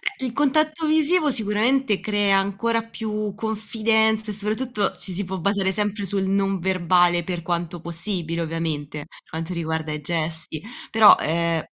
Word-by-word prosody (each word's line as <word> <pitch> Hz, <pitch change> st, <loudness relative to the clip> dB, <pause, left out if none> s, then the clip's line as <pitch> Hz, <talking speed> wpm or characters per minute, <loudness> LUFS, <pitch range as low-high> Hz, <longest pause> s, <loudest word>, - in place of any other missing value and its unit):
Eh 265 Hz, -, -5 dB
il 245 Hz, -, -4 dB
contatto 310 Hz, +3 st, +1 dB
visivo 310 Hz, 0 st, +3 dB
sicuramente 220 Hz, 0 st, +1 dB
crea 205 Hz, -2 st, +2 dB
ancora 200 Hz, +4 st, 0 dB
più 215 Hz, -2 st, -4 dB
confidenza 220 Hz, 0 st, 0 dB
e -, -, -5 dB
soprattutto 215 Hz, +1 st, -1 dB
ci 190 Hz, -, -1 dB
si 200 Hz, +3 st, -1 dB
può 190 Hz, +1 st, -4 dB
basare 195 Hz, +1 st, +1 dB
sempre 205 Hz, 0 st, -1 dB
sul 195 Hz, 0 st, 0 dB
non 195 Hz, -1 st, 0 dB
verbale 175 Hz, -1 st, +2 dB
per 175 Hz, -1 st, -4 dB
quanto 170 Hz, 0 st, -3 dB
possibile 170 Hz, 0 st, -2 dB
ovviamente, 160 Hz, -3 st, -3 dB
per 145 Hz, -, -14 dB
quanto 165 Hz, +2 st, -5 dB
riguarda 160 Hz, -2 st, -2 dB
i 150 Hz, 0 st, -4 dB
gesti 160 Hz, 0 st, -2 dB, 0.3 s
però 220 Hz, -2 st, +8 dB
ehm 165 Hz, 0 st, 0 dB
195 Hz, 155 wpm, -23 LUFS, 170-220 Hz, 0.3 s, però